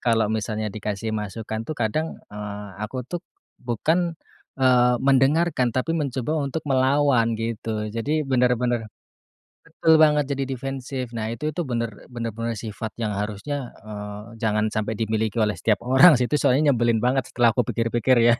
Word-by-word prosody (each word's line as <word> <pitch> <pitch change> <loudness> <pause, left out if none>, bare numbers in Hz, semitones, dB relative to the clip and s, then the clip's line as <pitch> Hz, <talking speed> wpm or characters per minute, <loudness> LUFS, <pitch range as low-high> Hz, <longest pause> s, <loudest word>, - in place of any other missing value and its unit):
kalau 110 -2 +2
misalnya 110 -1 -2
dikasih 105 +1 -3
masukan 110 +1 -4
tuh 155 - -3
kadang, 135 +8 -1 0.2
eee, 105 0 -6
aku 125 +4 -4
tuh 175 +6 -5 0.4
bukan, 160 +8 0 0.4
eee, 125 -2 +4
mendengarkan 135 +1 +3
tapi 145 +6 0
mencoba 150 0 -1
untuk 140 +2 -3
melawan 130 -4 +3
gitu. 110 -1 -3
Jadi 150 +7 -1
benar-benar 125 -3 +1 0.8
betul 160 -1 +4
banget, 150 -2 +5
jadi 135 -1 -2
defensif. 130 -1 -4
Nah, 110 -1 -3
itu 150 +7 -3
tu 175 - -4
benar-benar 115 -3 -4
sifat 110 +1 -5
yang 110 -3 -2
harusnya, 105 +7 -4 0.2
eee, 105 +2 -8
jangan 105 -1 +1
sampai 110 0 -2
dimiliki 110 0 -1
oleh 105 -2 +2
setiap 115 +1 +1
orang 130 +5 +7
sih. 125 - +1
Itu 150 +4 0
soalnya 145 +3 +4
nyebelin 120 -2 +1
banget 130 +1 +1
setelah 120 -2 +3
kupikir-pikir 120 +1 +1 0.2
ya. - - +5
120 Hz, 145 wpm, -24 LUFS, 110-135 Hz, 0.8 s, orang